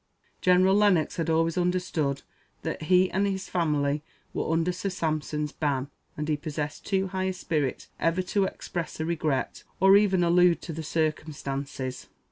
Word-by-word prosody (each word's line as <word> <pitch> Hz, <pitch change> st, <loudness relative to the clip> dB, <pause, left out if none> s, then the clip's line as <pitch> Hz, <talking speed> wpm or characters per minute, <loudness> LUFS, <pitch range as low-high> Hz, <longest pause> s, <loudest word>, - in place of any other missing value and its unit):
General 185 Hz, +1 st, +5 dB
Lennox 200 Hz, -6 st, +3 dB
had 165 Hz, -1 st, -1 dB
always 165 Hz, +1 st, +2 dB
understood 175 Hz, -6 st, 0 dB, 0.4 s
that -, -, -3 dB
he 185 Hz, +3 st, +3 dB
and 200 Hz, +1 st, +1 dB
his 190 Hz, -1 st, -3 dB
family 150 Hz, -4 st, 0 dB, 0.3 s
were -, -, -1 dB
under 165 Hz, +2 st, +2 dB
Sir 185 Hz, +2 st, -3 dB
Sampson's 155 Hz, -4 st, -2 dB
ban, 145 Hz, -2 st, -1 dB, 0.3 s
and 150 Hz, 0 st, -3 dB
he 155 Hz, -, +2 dB
possessed 150 Hz, -1 st, -5 dB
too 195 Hz, -1 st, +1 dB
high 190 Hz, 0 st, -2 dB
a 190 Hz, -, 0 dB
spirit 155 Hz, -6 st, -2 dB
ever 165 Hz, +3 st, +1 dB
to 195 Hz, +2 st, +1 dB
express 175 Hz, -3 st, -5 dB
a 160 Hz, -, -1 dB
regret, 155 Hz, -4 st, -1 dB, 0.2 s
or 195 Hz, +1 st, +7 dB
even 195 Hz, -3 st, +4 dB
allude 175 Hz, 0 st, +4 dB
to 165 Hz, -, -5 dB
the 160 Hz, -, -5 dB
circumstances. 145 Hz, -4 st, -3 dB
165 Hz, 160 wpm, -27 LUFS, 150-185 Hz, 0.4 s, or